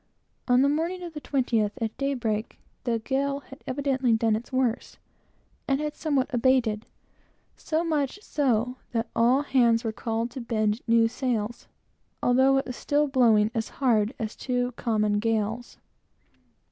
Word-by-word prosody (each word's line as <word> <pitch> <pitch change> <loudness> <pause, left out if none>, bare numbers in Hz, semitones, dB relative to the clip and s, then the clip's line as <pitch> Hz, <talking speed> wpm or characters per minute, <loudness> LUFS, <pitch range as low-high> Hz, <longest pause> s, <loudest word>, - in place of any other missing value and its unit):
On 250 +1 +5
the - - +4
morning 335 +5 -1
of 340 -2 -7
the 300 - -5
twentieth, 235 -8 0
at 225 -2 -3
daybreak, 235 -6 -2 0.3
the 235 -2 +1
gale 275 +4 -1
had 270 0 -14
evidently 265 -2 +1
done 225 -1 +2
its 230 +4 -6
worst, 255 -3 -1 0.7
and 275 0 +1
had 300 0 -3
somewhat 285 -3 -1
abated; 240 -3 +2 0.7
so 320 +1 -1
much 300 -2 -1
so, 250 -3 0 0.2
that 230 -1 -1
all 250 +5 +4
hands 235 -4 +3
were 225 - -1
called 225 +1 -3
to 260 - -6
bend 215 -1 0
new 230 0 +5
sails, 235 -2 -3 0.6
although 265 +2 +4
it 270 - 0
was 250 - -6
still 295 +3 +1
blowing 230 -6 +4
as 225 -2 -2
hard 235 -3 +2
as 220 -2 -4
two 250 -1 -1
common 215 -4 0
gales. 225 +1 -2
245 Hz, 150 wpm, -26 LUFS, 225-270 Hz, 0.7 s, On